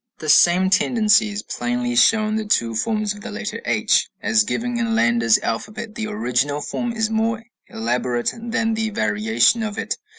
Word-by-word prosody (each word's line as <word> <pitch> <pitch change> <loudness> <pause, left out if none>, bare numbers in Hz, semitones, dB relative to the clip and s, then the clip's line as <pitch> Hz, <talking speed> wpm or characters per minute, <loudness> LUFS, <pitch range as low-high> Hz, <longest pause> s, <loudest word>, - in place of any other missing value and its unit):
The 155 - -6
same 180 +4 +5
tendency 215 +1 +3
is 205 0 -5
plainly 120 0 -3
shown 215 - +4
in 215 - -1
the 220 - -3
two 115 - +1
forms 215 - -1
of 205 - -13
the - - -7
letter - - -5
h, - - +1
as 110 0 +2
given 235 - -3
in 230 -1 0
Landa's 115 - +3
alphabet; 215 - -4
the 215 0 -4
original 145 - -1
form 240 +10 -4
is 225 -1 -2
more 225 0 -1 0.2
elaborate 120 +1 -2
than 230 -1 -2
the 220 0 -1
variation 110 - +1
of 215 -1 -4
it. - - -3
205 Hz, 175 wpm, -21 LUFS, -, 0.2 s, same